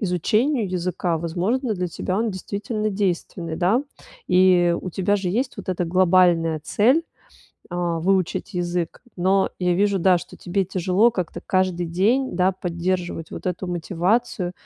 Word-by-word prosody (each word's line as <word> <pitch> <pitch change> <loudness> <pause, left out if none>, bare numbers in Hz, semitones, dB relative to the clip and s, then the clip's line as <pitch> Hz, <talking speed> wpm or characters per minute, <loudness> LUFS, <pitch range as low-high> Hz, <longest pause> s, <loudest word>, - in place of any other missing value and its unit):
изучению 215 - +1
языка, 180 -1 -1
возможно, 200 - -1
для 180 -1 -2
тебя 185 +3 -3
он 225 -1 0
действительно 205 +3 -3
действенный, 175 -4 -2
да. 195 +9 +2 0.5
И 180 -2 +4
у 185 - -5
тебя 195 +4 +1
же 190 -2 -2
есть 245 +5 -1
вот 200 - -9
эта 180 -1 -1
глобальная 175 -3 +3
цель, 255 - +3 0.7
а, 175 -1 -1
выучить 190 +2 0
язык. 175 -1 -2 0.2
Но 190 +2 +2
я 180 -1 +1
вижу, 200 +1 +2
да, 180 0 +4
что - - -11
тебе 195 +2 -1
тяжело 190 +5 +2
как-то 175 -4 -4
каждый 185 -4 0
день, 215 +9 +1
да, 185 +1 +3
поддерживать 175 -1 -3
вот - - -7
эту 180 +1 -2
мотивацию 180 +3 -1
185 Hz, 145 wpm, -23 LUFS, 175-200 Hz, 0.7 s, И